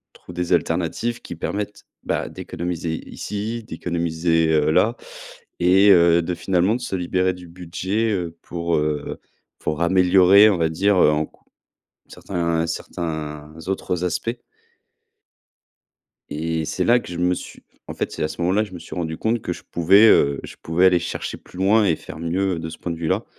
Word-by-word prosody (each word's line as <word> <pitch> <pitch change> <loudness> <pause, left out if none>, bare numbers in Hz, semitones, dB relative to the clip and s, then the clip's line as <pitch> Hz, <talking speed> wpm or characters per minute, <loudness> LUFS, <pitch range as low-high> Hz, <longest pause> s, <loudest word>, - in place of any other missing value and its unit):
on - - -17
trouve - - -12
des 90 -1 -1
alternatives 120 0 -1
qui - - -8
permettent, 100 +4 -4 0.2
bah, - - -2
d'économiser 85 -1 -4
ici, 110 +3 -4
d'économiser, 80 -2 0
heu, 75 -1 +3
là 115 +8 +3 0.6
et 95 +3 +5
heu, 85 -2 +6
de, 90 +2 -3
finalement, 90 +4 +1
de 125 - -5
se 110 - -3
libérer 90 +1 0
du 90 -1 -12
budget, 90 +6 -2
heu, 85 -4 -3
pour, 85 -1 -2
heu, 75 -1 -2 0.4
pour 75 +1 -3
améliorer, 95 +3 +6
on 95 - +1
va 80 -1 +1
dire, 95 +5 +2
heu, 85 - +6
en 75 +1 0
cou - - -26 0.7
certains 85 -3 -2
certains 80 -2 -5
autres 90 -2 -2
aspects 115 +8 -2 1.9
et 80 +1 -2
c'est - - -2
là 120 +1 +5
que - - -12
je 85 - -5
me 90 +1 +2
suis - - -10 0.3
en - - -5
fait, - - -3
c'est - - -4
à 75 - +1
ce 85 - -8
moment-là, 95 +5 +2
je 105 - -13
me 90 - -7
suis 85 - -9
rendu 80 -3 -3
compte 110 0 0
que 90 - -3
je - - -9
pouvais, 95 +6 +5
heu, 70 -8 +4
je - - -9
pouvais 85 +3 +3
aller 90 -2 +4
chercher 85 - -4
plus - - -15
loin 105 +3 +4
et 85 -5 +2
faire 80 - -10
mieux 90 +2 -1
de 80 - -5
ce 80 - -9
point 85 - -4
de 85 - -5
vue-là 80 -1 -1
90 Hz, 185 wpm, -22 LUFS, 80-95 Hz, 1.9 s, heu